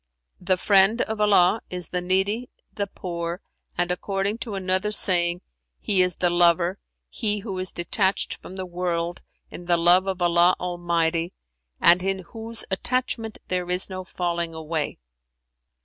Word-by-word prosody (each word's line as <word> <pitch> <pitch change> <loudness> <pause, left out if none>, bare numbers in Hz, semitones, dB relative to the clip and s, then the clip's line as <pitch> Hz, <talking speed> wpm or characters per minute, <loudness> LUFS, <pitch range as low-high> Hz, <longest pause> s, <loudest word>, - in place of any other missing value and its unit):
[FN#382] - - -18
"The 185 -1 +3
friend 195 +4 +4
of 220 -1 -4
Allah 205 0 +4
is 180 -2 -4
the 180 - -2
needy, 190 +6 0 0.2
the 200 -1 -2
poor, 170 -2 -5 0.4
and 175 0 0
(according 195 +4 -1
to 220 -5 -5
another 185 +1 -1
saying) 175 -4 +4 0.4
he 195 -3 +2
is 180 -1 +2
the 175 -1 +1
lover, 175 +2 +3 0.3
he 210 -3 -2
who 195 -2 -5
is 185 0 +2
detached 190 +3 0
from 185 - -10
the 190 -1 -5
world 175 -1 -3 0.3
in 175 - -9
the 175 -1 +3
love 175 +3 +4
of 190 -1 -2
Allah 175 +1 +4
Almighty 170 -1 -1 0.5
and 175 +1 +5
in 195 +1 0 0.2
whose 225 0 -3
attachment 225 +1 -1
there 180 -1 -2
is 180 +2 -1
no 185 0 -5
falling 170 -2 -3
away." 160 -1 -3
180 Hz, 155 wpm, -24 LUFS, 175-195 Hz, 0.5 s, and